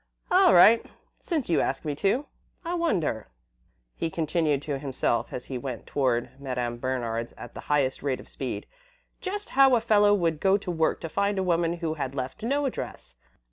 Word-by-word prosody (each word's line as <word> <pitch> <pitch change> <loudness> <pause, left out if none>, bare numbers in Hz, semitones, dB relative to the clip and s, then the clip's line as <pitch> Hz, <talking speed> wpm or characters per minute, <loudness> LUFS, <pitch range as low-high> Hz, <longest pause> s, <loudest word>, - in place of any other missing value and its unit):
"All 370 -1 +6
right, 225 +6 +7 0.4
since 315 -8 -2
you 170 - +2
ask 135 +4 -2
me 150 - -1
to. 220 - +1 0.4
I 340 - -2
wonder," 185 - 0 0.7
he 165 - -2
continued 155 -3 0
to 145 -3 -3
himself, 135 -4 -1
as 125 - -6
he 130 -2 -5
went 125 -3 -6
toward 125 -4 0
Madame 125 -3 -3
Bernard's 120 -2 -2
at 120 - -10
the - - -8
highest 140 -3 +1
rate 135 -2 -1
of - - -12
speed, - - -5 0.5
"just 410 +2 -5
how 270 -1 +5
a - - +3
fellow 205 -2 +4
would 165 -5 0
go 195 0 +4
to 195 -3 -5
work 160 -2 0
to 165 - -4
find 200 +4 0
a 190 - +1
woman 170 -2 +1
who 155 - 0
had 140 -3 -4
left 130 +9 -4
no 280 +6 0
address? 265 - -5
160 Hz, 185 wpm, -27 LUFS, 130-210 Hz, 0.7 s, right